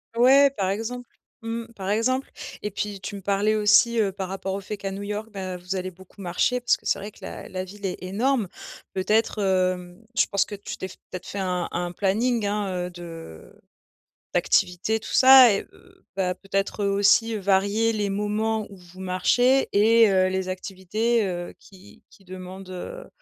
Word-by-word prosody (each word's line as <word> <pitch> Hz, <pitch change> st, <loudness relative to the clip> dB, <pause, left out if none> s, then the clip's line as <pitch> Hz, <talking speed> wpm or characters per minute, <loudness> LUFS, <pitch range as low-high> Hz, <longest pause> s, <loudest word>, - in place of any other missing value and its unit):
Ouais, 270 Hz, +4 st, +6 dB
par 190 Hz, -2 st, 0 dB
exemple, 230 Hz, +5 st, -4 dB, 0.3 s
mmh, 230 Hz, 0 st, -4 dB
par 195 Hz, -2 st, -5 dB
exemple, 255 Hz, +6 st, 0 dB, 0.3 s
et 210 Hz, -, -3 dB
puis, 205 Hz, 0 st, -4 dB
tu 195 Hz, -, -6 dB
me -, -, -9 dB
parlais 205 Hz, +3 st, +1 dB
aussi, 215 Hz, +2 st, +4 dB
heu, 200 Hz, -3 st, +1 dB
par 190 Hz, -1 st, -5 dB
rapport 190 Hz, 0 st, -4 dB
au 195 Hz, -, -3 dB
fait 210 Hz, +2 st, -6 dB
qu'à 195 Hz, -1 st, -4 dB
New 195 Hz, +1 st, -6 dB
York, 210 Hz, +2 st, -4 dB
ben, 185 Hz, -2 st, -5 dB
vous 180 Hz, +2 st, -5 dB
allez 185 Hz, 0 st, -3 dB
beaucoup 190 Hz, +2 st, -16 dB
marcher, 245 Hz, +7 st, 0 dB
parce -, -, +3 dB
que -, -, -26 dB
c'est -, -, +1 dB
vrai 205 Hz, +2 st, -7 dB
que -, -, -20 dB
la -, -, -8 dB
la 185 Hz, 0 st, -4 dB
ville 200 Hz, +2 st, -9 dB
est 185 Hz, -, -3 dB
énorme, 220 Hz, +5 st, 0 dB, 0.5 s
peut-être, 210 Hz, +3 st, +1 dB
hem, 185 Hz, 0 st, 0 dB, 0.2 s
je -, -, +5 dB
pense 200 Hz, -, +1 dB
que 205 Hz, -, -7 dB
tu 200 Hz, -, -7 dB
t'es 190 Hz, -, -5 dB
f -, -, -12 dB, 0.2 s
peut-être 185 Hz, -, -7 dB
fait 200 Hz, -, -5 dB
un 180 Hz, -2 st, -1 dB
un 175 Hz, 0 st, -2 dB
planning, 215 Hz, +5 st, 0 dB
hein, 200 Hz, -3 st, -1 dB
heu, -, -, -7 dB
de 165 Hz, -, -10 dB, 0.8 s
d'activités, 190 Hz, +5 st, +1 dB
tout -, -, -8 dB
ça 260 Hz, -3 st, +9 dB
et 195 Hz, -, 0 dB
heu, -, -, -22 dB
bah, 180 Hz, -1 st, 0 dB
peut-être, 195 Hz, +1 st, -2 dB
heu, 200 Hz, -, +2 dB
aussi 205 Hz, +3 st, +3 dB
varier 200 Hz, +3 st, +2 dB
les 205 Hz, -2 st, -1 dB
moments 210 Hz, +2 st, -1 dB
où 200 Hz, -, -11 dB
vous 180 Hz, 0 st, -15 dB
marchez, 245 Hz, +8 st, +2 dB
et 225 Hz, +2 st, +5 dB
heu, 185 Hz, -1 st, +3 dB
les 190 Hz, 0 st, -2 dB
activités, 195 Hz, +5 st, -1 dB
heu, 175 Hz, -1 st, -5 dB
qui 195 Hz, +1 st, -18 dB
qui 195 Hz, -, -21 dB
demandent, 185 Hz, +1 st, -9 dB
heu -, -, -7 dB
200 Hz, 195 wpm, -25 LUFS, 185-220 Hz, 0.8 s, ça